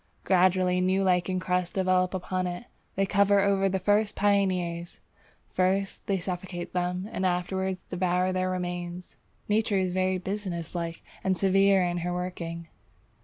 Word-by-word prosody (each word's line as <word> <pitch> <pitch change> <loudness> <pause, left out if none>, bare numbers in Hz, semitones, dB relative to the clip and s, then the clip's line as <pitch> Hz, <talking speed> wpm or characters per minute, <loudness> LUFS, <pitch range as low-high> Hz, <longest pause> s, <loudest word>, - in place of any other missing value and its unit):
Gradually 185 -1 +3
new 190 +1 +2
lichen 185 0 +1
crusts 180 -1 -1
develop 185 -1 +2
upon 185 0 -2
it. 175 +4 -5 0.3
They 195 - +2
cover 200 0 +3
over 195 -1 +2
the 190 - 0
first 205 +2 +1
pioneers; 185 -4 0 0.5
first 190 +1 0
they 195 - +1
suffocate 180 -1 -5
them 180 +1 -1
and 190 - -3
afterwards 185 +1 -1
devour 180 0 0
their 185 0 0
remains. 175 -1 -4 0.3
Nature 210 -1 +2
is 185 -1 0
very 185 0 +1
businesslike 175 -3 -4 0.2
and 190 -1 +1
severe 195 0 +4
in 175 0 -1
her 175 +1 -2
working. 170 -2 -5
185 Hz, 140 wpm, -27 LUFS, 180-195 Hz, 0.5 s, severe